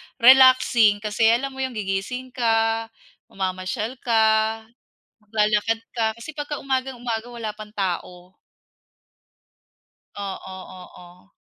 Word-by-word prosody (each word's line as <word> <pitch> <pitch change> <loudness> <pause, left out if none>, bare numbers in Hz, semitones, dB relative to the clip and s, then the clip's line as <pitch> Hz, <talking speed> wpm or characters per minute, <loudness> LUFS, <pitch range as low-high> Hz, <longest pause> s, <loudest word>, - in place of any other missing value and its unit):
relaxing 245 -4 +6
kasi 215 +1 +2
alam 255 +4 +2
mo 265 - -11
yung 260 -2 -3
gigising 215 +6 -3
ka, 225 -1 +1 0.4
mamamasyal 195 +6 -4
ka, 220 -1 +2 0.6
maglalakad 215 +1 0
ka. 220 -2 -1
Kasi 235 +7 -9
pagka 295 -1 -4
umagang-umaga 250 -4 -2
wala 230 -3 -5
pang 210 0 -10
tao. 180 -1 -4 1.9
Oo, 190 -1 -6 0.2
oo. 180 +1 -16
225 Hz, 100 wpm, -23 LUFS, 205-245 Hz, 1.9 s, relaxing